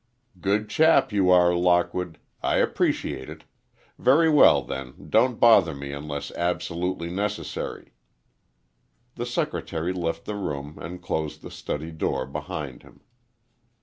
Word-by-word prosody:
"Good 100 +4 0
chap 160 -3 +4
you 95 -3 +3
are, 90 -1 +5
Lockwood. 90 0 +1 0.2
I - - +1
appreciate 65 0 0
it. - - -10 0.6
Very 155 +6 +4
well, 150 - +6
then, 65 -1 -6 0.2
don't - - +3
bother - - +6
me 70 0 -6
unless 70 0 -5
absolutely 85 0 -2
necessary." 105 +3 -4 1.2
The 120 0 -5
secretary 85 -7 -2
left 85 -2 -3
the 105 - -4
room 75 -6 -5
and 90 +1 -8
closed 80 -4 -3
the - - -9
study 80 +3 -5
door 80 - -2
behind - - -6
him. - - -19
90 Hz, 125 wpm, -25 LUFS, 80-100 Hz, 1.2 s, well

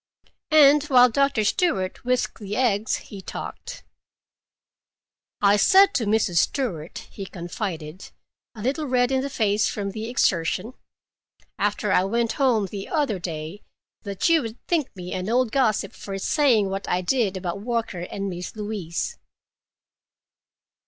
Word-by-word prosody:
And 295 -1 +7
while 250 -3 +6
Doctor 275 -3 +2
Stewart 205 - 0
whisked 250 0 -1
the 205 -1 -5
eggs 220 -4 +1
he 200 -2 -9
talked. 485 - -8 1.6
"I 205 0 +5
said 390 - +6
to 225 - 0
Mrs. 205 -5 +2
Stewart," 175 - -2
he 195 -2 -7
confided, 170 -2 -6 0.5
a 210 - -8
little 285 +5 -1
red 250 0 +2
in 265 -1 +2
the 280 - -3
face 210 -5 +1
from 200 -2 -3
the 220 +3 -5
exertion, 190 0 0 0.9
"after 205 0 0
I 180 - +4
went 230 +3 0
home 235 -6 +3
the 195 +1 -7
other 285 - 0
day, 165 +2 -6 0.4
that 200 -2 -2
you 330 -2 +4
would 225 -1 -6
think 320 -6 +1
me 180 -1 -7
an 185 +2 -3
old 245 -1 +2
gossip, 220 -7 +1
for 195 -1 -6
saying 225 -3 +2
what 195 +1 -4
I 180 - +1
did 200 -1 0
about 180 +1 -4
Walker 230 -5 -2
and 195 +3 -5
Miss 180 +1 -6
Louise." 205 -6 -4
210 Hz, 145 wpm, -24 LUFS, 190-255 Hz, 1.6 s, And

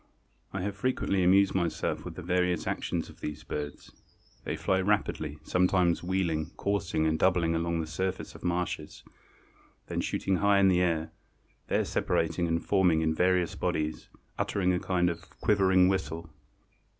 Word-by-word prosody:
I 95 - -3
have 100 +1 -3
frequently 100 -4 0
amused 95 +2 +5
myself 85 -3 -1
with - - -7
the 90 - -7
various 90 0 +1
actions - - -2
of - - -15
these 75 0 -6
birds. 75 -1 -6 0.5
They - - -2
fly 95 0 +1
rapidly, 95 -7 0
sometimes 90 -1 +2
wheeling, 85 -4 -1
coursing 100 -5 0
and 80 0 +1
doubling 90 -3 +3
along 85 0 0
the - - -3
surface 95 +3 -3
of - - -13
the - - -2
marshes; 85 -3 -3 0.9
then - - -1
shooting 95 -1 0
high 100 +1 +4
in 100 -1 +5
the 90 -1 +3
air, 80 -2 0 0.6
there - - +1
separating 85 +1 0
and 85 0 -1
forming 90 -5 +3
in 80 0 +1
various 90 0 +2
bodies, 75 0 -2 0.3
uttering 90 -2 +1
a 90 - +1
kind 90 -1 +1
of 85 -1 -4
quivering 95 -3 +4
whistle." 85 -3 -2
90 Hz, 160 wpm, -29 LUFS, 80-95 Hz, 0.9 s, amused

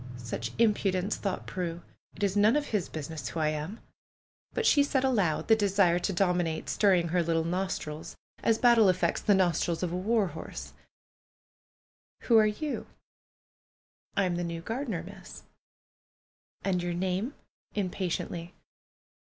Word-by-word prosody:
" 125 - -10
Such 120 -1 -5
impudence 205 -3 +2
I" - - -17
thought 195 -3 -2
Prue. 175 -2 -4 0.3
"It - - -5
is 200 -1 +1
none 210 +4 +5
of 295 -1 0
his 210 -5 -1
business 155 -3 -5
who 165 - -4
I 155 -1 +2
am 155 +8 -4 0.4
!" - - -48
But 465 - 0
she 290 - +6
said 275 -2 +1
aloud, 205 -12 +1
the 225 - +6
desire 195 -4 +3
to 180 - -1
dominate 175 -3 0
stirring 185 -5 +3
her 175 +1 +2
little 165 -1 +1
nostrils 165 -3 -3 0.3
as 225 - +3
battle 230 -4 +6
affects 185 0 +1
the 205 - +4
nostrils 175 -2 +1
of 175 - -1
a - - -2
war 210 +3 +2
horse: 160 +1 -8 1.5
"Who 230 -2 +5
are 215 - +5
you?" 280 +8 -3 1.3
"I 200 - +4
am 180 -2 0
the 175 - -1
new 170 -1 -4
gardener. 225 - -3
Miss." 195 +3 -11 1.2
"And 185 -2 +1
your 175 0 -2
name?" 190 - -1 0.4
impatiently. 180 -2 -3
185 Hz, 155 wpm, -29 LUFS, 170-210 Hz, 1.5 s, she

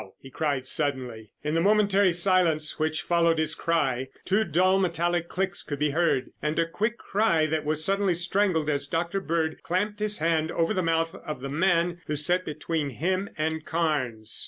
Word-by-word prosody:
he 135 - -13
cried 140 -2 -2
suddenly. 125 -7 -1
In 150 +1 -2
the 165 - +2
momentary 200 -1 +3
silence 170 -4 +2
which 155 0 -1
followed 170 -1 +2
his 155 0 +1
cry, 135 -7 0 0.2
two 200 +4 +2
dull 185 +2 +2
metallic 175 -1 0
clicks 190 0 -2
could 145 - -5
be 150 +1 0
heard, 160 -5 0
and 150 +1 -2
a 165 - +3
quick 215 +7 -2
cry 195 -7 +1
that 155 -1 -2
was 155 +1 +1
suddenly 195 -1 +2
strangled 175 -2 +1
as 140 -1 0
Dr. 175 +5 -2
Bird 160 -2 -2
clamped 205 +4 -2
his 210 0 +1
hand 160 0 +1
over 165 +5 +1
the 185 - 0
mouth 165 -1 0
of 150 -5 -7
the 135 - -5
man 175 +2 +1
who 150 - -1
sat 175 +5 +2
between 155 0 -3
him 185 +9 -2
and 160 0 -2
Carnes. 130 -11 -1
165 Hz, 180 wpm, -26 LUFS, 150-185 Hz, 0.2 s, momentary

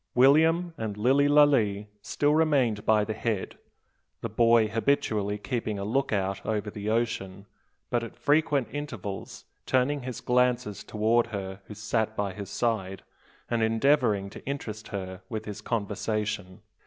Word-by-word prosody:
William 160 +6 +4
and 105 -2 -3
Lilly 135 +6 +3
Lalee 135 -9 +4 0.2
still 145 +7 +1
remained 140 -9 +2
by 110 -1 +4
the 110 - -3
head, 110 -2 -3 0.6
the - - -3
boy 115 -1 +4
habitually 110 -3 0
keeping 110 -1 -3
a 100 - -4
lookout 105 -5 -1
over 105 -1 -2
the 105 0 -4
ocean, 100 -4 -2 0.5
but 120 -1 +1
at 115 - -8
frequent 145 -3 +2
intervals 120 -10 -6 0.2
turning 135 +3 +2
his 125 -1 -5
glances 125 -3 +1
towards 115 +2 +1
her 95 -2 -5
who 105 - -10
sat 110 0 -1
by 100 -2 -2
his 100 0 -7
side, 95 -5 -2 0.4
and 120 -1 0
endeavouring 110 -3 +2
to - - -11
interest 110 -6 -5
her 95 -2 -6
with 110 0 -4
his 105 -2 -6
conversation. 105 -2 -3
110 Hz, 140 wpm, -27 LUFS, 105-125 Hz, 0.6 s, William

